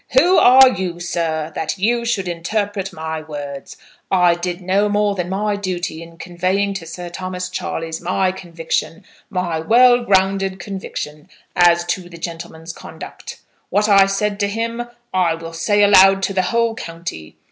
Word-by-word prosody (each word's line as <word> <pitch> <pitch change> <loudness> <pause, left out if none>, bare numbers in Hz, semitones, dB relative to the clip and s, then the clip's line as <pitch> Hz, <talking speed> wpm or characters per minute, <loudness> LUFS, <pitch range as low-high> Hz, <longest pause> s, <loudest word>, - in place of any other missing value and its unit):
"Who 355 +7 +6
are 260 +1 +8
you, 185 -6 -4
sir, 165 -2 -2
that 160 +4 -3
you 235 +4 +1
should 205 -6 -1
interpret 195 +3 -2
my 160 -2 -5
words? 145 -3 -8 0.3
I 180 -2 +4
did 175 +1 -4
no 195 +3 +1
more 205 0 +1
than 180 -2 -3
my 205 +2 -1
duty 180 -5 -4
in 165 0 -12
conveying 185 +3 -1
to 190 -4 -6
Sir 175 +2 -7
Thomas 180 +1 -5
Charleys 165 -2 -4
my 185 +1 +1
conviction, 170 0 -4 0.2
my 175 -3 -2
well 245 +7 +5
grounded 195 -2 +1
conviction, 175 -5 -7 0.3
as 175 -1 +4
to 175 0 -3
the 170 - -11
gentleman's 165 -1 -7
conduct. - - -10 0.3
What 205 +3 +2
I 195 -2 +6
said 205 +1 -1
to 200 - +1
him 230 +3 -3 0.3
I 180 -3 +2
will 165 0 -9
say 205 +5 +2
aloud 195 -1 +6
to 195 - 0
the 190 - +2
whole 230 -1 +1
county. 165 - -7
185 Hz, 160 wpm, -19 LUFS, 170-200 Hz, 0.3 s, are